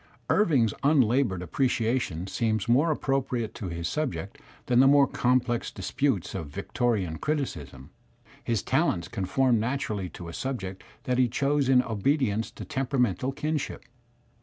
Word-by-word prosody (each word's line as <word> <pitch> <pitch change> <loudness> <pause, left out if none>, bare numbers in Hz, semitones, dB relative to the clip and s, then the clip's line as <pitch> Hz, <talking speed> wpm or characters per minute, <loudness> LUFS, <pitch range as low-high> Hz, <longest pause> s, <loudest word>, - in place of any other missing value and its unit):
Irving's 140 - +3
un 145 +1 +4
laboured 115 -6 +2
appreciation 115 - 0
seems 110 +1 -1
more 135 +8 +4
appropriate 135 -6 -1
to 100 - -6
his 85 -1 -3
subject 130 - -3 0.3
than 120 -1 +3
the 135 - +7
more 140 0 +6
complex 125 -2 0
disputes 110 - -1
of 85 -6 -4
Victorian 90 +1 -1
criticism; 75 - -4 0.5
his 115 -4 -1
talents 85 0 +1
conform 115 +5 +1
naturally 110 -6 -2
to 85 - -9
a 85 - -7
subject 95 -8 -4 0.2
that 125 0 0
he 125 - +5
chose 140 +2 +1
in 125 -1 +5
obedience 115 0 0
to - - -9
temperamental 130 - 0
kinship. 150 +1 -3
120 Hz, 135 wpm, -27 LUFS, 95-135 Hz, 0.5 s, the